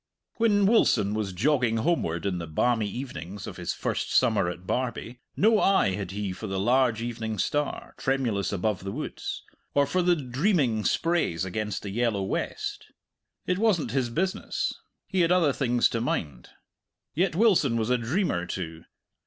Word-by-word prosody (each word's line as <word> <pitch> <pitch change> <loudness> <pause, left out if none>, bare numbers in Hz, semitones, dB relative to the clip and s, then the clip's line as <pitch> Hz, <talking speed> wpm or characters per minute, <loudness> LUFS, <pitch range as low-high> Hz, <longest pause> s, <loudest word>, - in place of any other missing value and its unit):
When 205 -3 +3
Wilson 195 - +3
was 105 -3 -2
jogging 120 +3 +1
homeward 110 - 0
in 90 -3 -1
the 85 - -5
balmy 110 +6 +1
evenings 100 - -6
of - - -8
his 90 -1 -3
first - - -2
summer 85 - +3
at 90 +1 -8
Barbie, 125 +1 -3 0.2
no 220 +1 +4
eye 195 - +4
had 95 -1 -4
he 100 0 -3
for 110 - -7
the 95 -1 -2
large 120 +1 +2
evening 110 -2 -4
star, 145 +8 -2
tremulous 120 -8 0
above 100 0 -1
the 95 - -4
woods, 150 +9 -5 0.3
or 140 0 +5
for 180 +7 0
the 175 0 +4
dreaming 130 - +1
sprays 165 - +1
against 105 +2 -3
the 100 - -5
yellow 110 -2 0
west. 95 - -3 0.6
It 180 +1 0
wasn't 190 - +2
his 130 -2 0
business; 185 +10 -1 0.3
he 190 -2 0
had 170 0 +3
other 170 -6 +4
things 120 -3 +2
to 115 - -2
mind. 75 - -3 0.6
Yet 175 +1 +1
Wilson 175 - +3
was 115 +2 0
a 125 - +4
dreamer 120 - -1
too. 80 -3 -5
120 Hz, 165 wpm, -27 LUFS, 100-155 Hz, 0.6 s, or